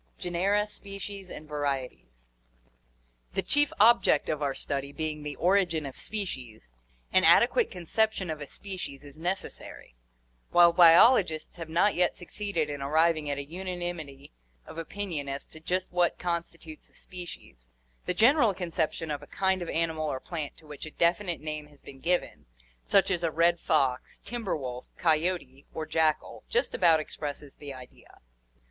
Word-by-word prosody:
Genera, 195 +4 +1
Species, 200 -2 -8
and 155 - -9
Varieties. 135 - -4 0.5
— - - -39
The - - +1
chief 290 0 +2
object 235 +3 +5
of 155 -1 -1
our 140 -2 -1
study 140 0 -3
being 155 0 -3
the 150 -1 -5
origin 175 -3 +2
of 135 - -7
species, 125 - -6 0.4
an 185 - +5
adequate 240 - +5
conception 190 +1 -1
of 155 -1 -6
a 145 - -6
species 180 -8 -6
is 145 -1 -13
necessary. 175 - -5 0.6
While 170 -1 +6
biologists 170 0 +6
have 165 -2 -7
not 175 +6 +3
yet 180 0 +1
succeeded 180 -3 -2
in 145 -1 -5
arriving 155 +1 +2
at 140 - -1
a 140 - -4
unanimity 175 -4 -6 0.3
of 165 - -8
opinion 165 -5 -3
as 140 0 -4
to 160 - -12
just 185 +3 -2
what 175 -1 +2
constitutes 170 -2 -5
a - - -26
species, 165 - -10 0.4
the - - 0
general 235 -4 +5
conception 165 -3 -2
of 145 - -3
a - - -12
kind 190 -1 0
of 175 - -4
animal 160 -1 -1
or 130 - -3
plant 155 -1 -5
to 160 - -18
which 150 0 -8
a - - -6
definite 170 +2 +1
name 155 -1 -5
has 145 -1 -21
been 135 - -12
given, 175 - -1 0.4
such 195 -1 +4
as 175 - +1
a 165 - +1
red 170 +2 +3
fox, 135 -7 0
timber 235 -7 -2
wolf, 125 -3 -6
coyote, 160 -4 0
or 160 - -3
jackal, 155 -1 0
just 475 +1 +1
about 165 -4 +5
expresses 145 -2 -6
the 145 -1 -8
idea. 130 -2 -13
165 Hz, 160 wpm, -28 LUFS, 145-185 Hz, 0.6 s, While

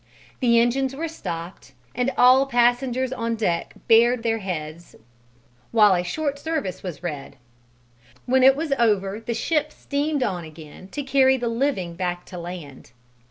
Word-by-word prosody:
The 235 -3 +4
engines 265 +3 +1
were 325 +4 -3
stopped 170 - -7 0.2
and 250 +2 0
all 260 +2 +6
passengers 245 +1 +1
on 230 -2 -2
deck 175 -6 -2
bared 230 +1 +5
their 225 -1 0
heads 170 -4 -6 0.7
while 210 -3 +5
a 180 -1 0
short 285 - -3
service 285 - -3
was 175 -3 -7
read; 145 -5 -6 0.9
when 260 +1 +3
it 265 +1 +7
was 300 -1 -1
over 205 -3 +1
the 230 +1 -4
ship 300 +5 0
steamed 285 -1 -2
on 180 -6 -2
again 155 +2 -12
to 290 +8 -5
carry 265 -1 +3
the 240 -2 -2
living 230 -8 -1
back 175 0 -3
to 180 - -9
land. 165 -9 -9
230 Hz, 155 wpm, -23 LUFS, 180-265 Hz, 0.9 s, it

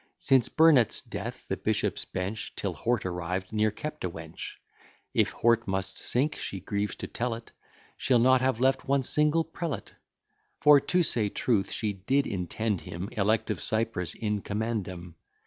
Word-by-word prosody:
Since 130 -3 +3
Burnet's 155 -8 +5
death, - - -6
the - - -2
bishops' - - 0
bench, 95 +4 -4
Till 100 -3 -2
Hort 115 +6 -1
arrived, 90 +2 -3
ne'er 110 0 +3
kept 150 +8 -6
a 90 - 0
wench; 80 -1 -8 0.6
If - - +3
Hort 115 -1 +2
must 95 0 -1
sink, 140 +5 0
she 95 - -4
grieves 100 +2 -2
to - - -6
tell 120 -1 -2
it, 115 0 -11 0.5
She'll 125 - +3
not 130 +2 +5
have 130 -3 +1
left 130 +1 +2
one 140 0 +2
single 150 +4 +3
prelate: 160 - -5 0.7
For, 145 -1 +7
to 180 +5 +1
say 110 -9 +2
truth, 105 -2 0
she 105 -2 -1
did 130 +9 +1
intend 100 +1 -2
him, 90 +4 -6
Elect 110 +2 +1
of - - -3
Cyprus 110 -7 -1
_in 105 -2 -2
commendam. 100 -6 -3
110 Hz, 165 wpm, -28 LUFS, 95-130 Hz, 0.7 s, For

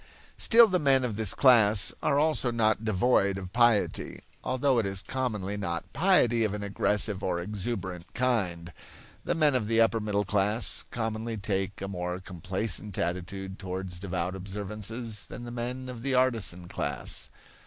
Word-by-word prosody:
Still 230 0 +6
the 185 -3 +1
men 135 -3 +3
of 115 -4 -3
this 105 -3 0
class 110 -7 +5
are 140 - +2
also 150 -4 +2
not 110 -2 +1
devoid 100 -2 +2
of 95 -1 -8
piety, 120 -3 +2 0.2
although 130 -1 +1
it 110 - 0
is 95 -1 -2
commonly 105 -7 -3
not 85 -4 -4
piety 140 - +3
of 105 -2 0
an 105 - -5
aggressive 100 0 0
or 90 -2 -1
exuberant 95 -2 -5
kind. 90 -10 -1 0.5
The - - 0
men 150 -3 +3
of 120 -5 0
the 115 +1 +2
upper 115 0 +4
middle 105 -1 -1
class 105 +3 +2
commonly 110 0 -3
take 95 -1 -2
a - - -3
more 90 -1 -4
complacent 95 +2 -3
attitude 95 +3 -4
towards 95 -2 -5
devout 90 -1 -3
observances 105 +3 -4
than 120 - -9
the 120 - -7
men 125 +2 -4
of 125 -2 -7
the 135 +1 0
artisan 115 -9 0
class. - - -3
105 Hz, 160 wpm, -28 LUFS, 95-120 Hz, 0.5 s, Still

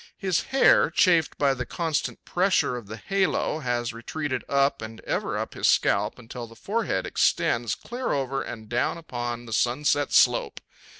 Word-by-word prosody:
His 185 -3 0
hair, 265 - +4
chafed 165 -1 +3
by 140 -2 +3
the 125 -1 -4
constant 160 +4 -3
pressure 185 -8 +1
of 120 -4 -7
the 110 +2 -7
halo, 190 - 0
has 120 -4 -2
retreated 130 +3 -4
up 140 -1 +2
and 110 0 -8
ever - - -2
up - - -4
his - - 0
scalp - - +2
until 120 0 -8
the 115 - -15
forehead 225 - -2
extends - - +1
clear 245 +2 -4
over 135 -1 -1
and 110 -2 -7
down 120 +8 0
upon 120 -6 -5
the 115 - -7
sunset 145 +5 +1
slope. - - +3
135 Hz, 165 wpm, -25 LUFS, 120-165 Hz, -, hair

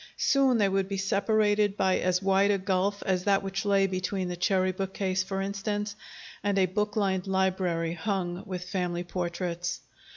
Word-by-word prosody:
Soon 270 -3 +3
they 205 -2 +3
would 195 0 0
be 195 - -2
separated 205 +1 +2
by 190 -1 +2
as 185 +1 +1
wide 195 +1 +3
a 205 - +3
gulf 195 +1 0
as 185 -1 0
that 200 -1 +3
which 195 +1 -3
lay 200 -1 +4
between 185 0 -2
the 180 - -3
cherry 185 +1 +1
bookcase 190 0 -2
for 195 +1 -3
instance, 205 +1 -3 0.5
and 200 -1 +1
a 190 - +5
book 210 +3 -2
lined 195 -3 0
library 185 -3 0
hung 180 -1 -2
with 180 -1 -5
family 180 -2 -2
portraits. 175 0 -3
195 Hz, 170 wpm, -28 LUFS, 185-200 Hz, 0.5 s, a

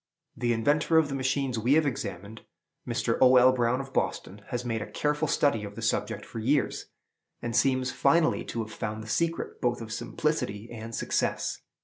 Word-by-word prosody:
The 120 -1 0
inventor 145 +8 +2
of 160 -2 +4
the - - -4
machines 135 -2 0
we 120 +5 +2
have 155 0 +4
examined, 105 -4 -4 0.5
Mr. - - 0
O. 130 0 +7
L. 125 +1 +7
Brown, 125 0 +1
of 135 0 -7
Boston, 100 +2 -2
has 120 0 -3
made 115 -2 -1
a 110 - -6
careful 150 +1 0
study 140 -7 +2
of 100 0 -7
the - - -7
subject - - -1
for 115 - -7
years, 135 +6 0 0.5
and 115 -1 -4
seems 130 +1 +2
finally 165 -1 +2
to 115 - -3
have 110 - -10
found 110 0 -4
the - - -10
secret, 165 +7 -1
both 120 -1 +1
of 110 -1 -6
simplicity 120 -9 -2
and 115 0 -7
success. - - -1
125 Hz, 190 wpm, -28 LUFS, 115-140 Hz, 0.5 s, O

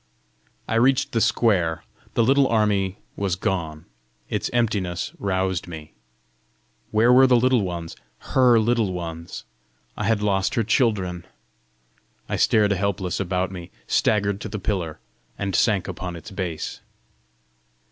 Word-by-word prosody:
I - - -2
reached 130 +1 +3
the 115 - +1
square: 90 -11 +2 0.3
the 115 - +4
little 135 +3 +4
army 105 -4 +1 0.2
was 95 -3 -1
gone! 80 -5 -3 0.4
Its - - -2
emptiness 105 -7 -1
roused 95 -2 -1
me. 80 -3 -9 1.0
Where 115 +3 +4
were 130 +1 +7
the 125 - +5
Little 125 0 +3
Ones, 85 -3 -5 0.4
HER 125 -3 +5
Little 110 -3 +1
Ones? 85 -1 -6 0.5
I - - -3
had 110 -2 +1
lost 95 -2 +1
her 115 - +2
children! 100 -6 0 1.0
I - - -2
stared 105 -2 +3
helpless 95 -2 -1
about 95 0 -1
me, 90 -2 -8 0.2
staggered 100 -1 +1
to 110 - -5
the 105 - -4
pillar, 90 -6 -3 0.4
and 100 -2 -2
sank 105 -5 +2
upon 90 -1 -5
its 85 +6 -10
base. 90 -5 -4
100 Hz, 135 wpm, -23 LUFS, 90-115 Hz, 1.0 s, were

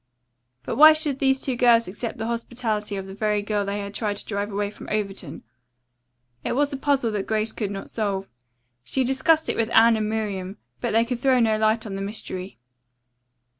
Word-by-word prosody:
But - - -4
why 310 +2 +10
should 305 -3 -1
these 265 -1 +2
two 260 - -1
girls 235 -1 +4
accept 215 +5 -5
the 220 - -3
hospitality 230 -3 -3
of 195 -1 -5
the 190 - -9
very 210 0 0
girl 210 -1 -1
they 200 +1 -3
had 200 0 -7
tried 205 -2 -2
to - - -7
drive 205 0 -3
away 205 0 -2
from - - -11
Overton? 205 -2 -4 1.0
It - - -1
was 285 +2 +1
a - - -2
puzzle 275 -4 +1
that 205 -2 -3
Grace 220 0 0
could 210 -3 -3
not 195 -1 -6
solve. 195 -3 -2 0.6
She 260 - 0
discussed 310 +5 +2
it - - -1
with 225 -1 +1
Anne 230 0 +6
and 215 -1 -1
Miriam 205 -3 -3 0.2
but - - -2
they 225 +1 +4
could 245 0 -3
throw 260 0 +3
no 225 -2 +3
light 220 +1 +1
on 205 - -6
the 195 - -4
mystery. 195 -2 -5
220 Hz, 205 wpm, -24 LUFS, 205-245 Hz, 1.0 s, why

